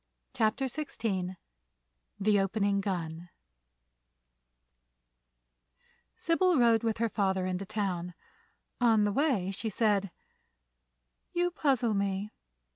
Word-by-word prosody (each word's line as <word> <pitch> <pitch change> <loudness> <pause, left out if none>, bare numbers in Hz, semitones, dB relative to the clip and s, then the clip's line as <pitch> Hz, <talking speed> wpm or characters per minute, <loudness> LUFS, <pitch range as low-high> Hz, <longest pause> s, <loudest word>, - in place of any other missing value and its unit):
CHAPTER 220 +5 +1
XVI 205 -10 -3 0.8
THE 205 0 +3
OPENING 200 0 +1
GUN 175 -3 -4 2.9
Sybil 345 +1 +2
rode 235 -2 +4
with 225 -2 -1
her 230 +1 +1
father 190 -3 0
into 185 +1 -3
town. 185 -5 -3 0.6
On 225 -3 +4
the 205 - +2
way 245 - +1
she 220 +3 -4
said: 205 -2 +1 1.2
"You 350 0 +1
puzzle 260 -9 +1
me. 200 +1 -1
210 Hz, 95 wpm, -30 LUFS, 190-235 Hz, 2.9 s, rode